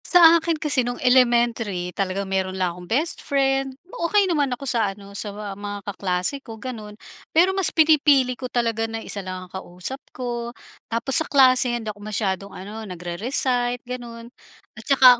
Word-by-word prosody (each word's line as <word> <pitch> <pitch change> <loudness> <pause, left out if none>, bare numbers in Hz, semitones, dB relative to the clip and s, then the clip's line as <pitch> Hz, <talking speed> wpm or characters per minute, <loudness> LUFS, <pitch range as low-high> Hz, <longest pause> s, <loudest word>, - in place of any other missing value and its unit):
Sa 335 -2 +7
akin 330 -1 -1
kasi 295 -4 +1
nung 245 0 -3
elementary 235 -7 +2
talagang 195 0 -2
meron 190 0 -2
lang 180 -2 0
akong 180 0 -12
bestfriend, 270 -1 0
okey 400 0 +1
naman 300 -7 +1
ako 250 +2 -5
sa 230 -5 +2
ano 200 0 -13
sa 205 +1 -3 0.2
mga 205 0 -7
kaklase 190 +6 -2
ko 225 -4 -10
ganun. 215 -4 -8 0.3
Pero 355 +4 +3
mas 380 -3 +6
pinipili 290 -5 +4
ko 255 0 -7
talaga 230 -2 -1
na 225 - -4
isa 200 - -3
lang 185 -1 -7
ang 180 - -21
kausap 190 +8 -5
ko, 240 -1 -5 0.3
tapos 235 +6 +3
sa - - -4
klase 255 -3 +5
hindi 220 -2 -5
ako 205 - -18
masyadong 200 -2 -2
ano 205 +4 -8
nagre-recite 245 +8 -1
ganun 240 -1 -8 0.4
at - - -12
tsaka, 255 -3 +7
240 Hz, 165 wpm, -23 LUFS, 200-270 Hz, 0.4 s, Sa